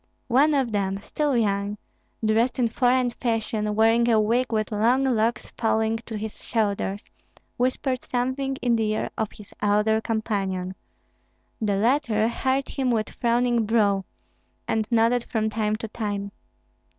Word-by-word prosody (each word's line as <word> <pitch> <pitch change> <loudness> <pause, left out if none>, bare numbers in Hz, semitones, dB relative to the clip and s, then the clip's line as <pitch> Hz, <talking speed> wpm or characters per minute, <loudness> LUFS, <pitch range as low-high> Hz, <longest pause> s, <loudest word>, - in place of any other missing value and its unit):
One 290 +4 +5
of 265 -4 +1
them, 195 -2 -1
still 290 +2 0
young, 205 -2 0 0.5
dressed 225 +3 +2
in 240 -3 +2
foreign 250 +1 +2
fashion, 220 -3 -1
wearing 225 +2 +4
a 225 -2 +4
wig 235 +4 +1
with 215 -1 -1
long 235 +6 +2
locks 230 -3 0
falling 220 -1 0
to 220 - -4
his 215 0 -7
shoulders, 205 -3 -1 0.5
whispered 255 +1 0
something 260 +2 -2
in 240 -1 +3
the 220 -1 0
ear 215 - -2
of 220 -1 -2
his 210 - -14
elder 210 +1 +2
companion; 195 -5 -2 0.9
the 205 -2 +1
latter 225 0 +2
heard 265 +3 -1
him 265 -2 -1
with 220 -3 0
frowning 235 -1 +1
brow, 205 -3 +2 0.6
and 220 -1 0
nodded 235 +1 +3
from 220 -1 -1
time 215 -1 0
to 225 +1 -5
time. 205 -2 -4
225 Hz, 145 wpm, -25 LUFS, 210-245 Hz, 0.9 s, One